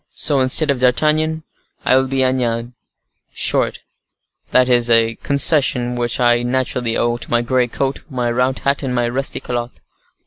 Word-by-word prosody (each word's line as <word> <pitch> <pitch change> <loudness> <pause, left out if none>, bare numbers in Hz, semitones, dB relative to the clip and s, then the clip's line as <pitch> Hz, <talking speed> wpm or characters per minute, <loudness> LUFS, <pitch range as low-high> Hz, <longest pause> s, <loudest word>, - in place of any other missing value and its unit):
So, 145 -3 +2
instead 130 +3 +2
of 135 - -3
D'Artagnan, 155 +5 +1 0.4
I - - +4
will 130 0 +2
be 135 0 0
Agnan, 120 -2 -1 0.6
short; - - 0 0.7
that 125 0 +3
is 120 -1 +2
a 115 -1 +3
concession 140 -4 +2
which 120 -1 -1
I 120 -1 +3
naturally 125 -1 -2
owe 120 0 0
to 115 - -7
my 120 0 +1
gray 125 +1 0
coat, 135 +3 -3
my 125 -3 -2
round 125 +2 0
hat, 140 +1 +1
and 130 -3 -3
my 120 -1 0
rusty 130 +3 -1
calotte." 120 0 -5
125 Hz, 165 wpm, -18 LUFS, 120-135 Hz, 0.7 s, I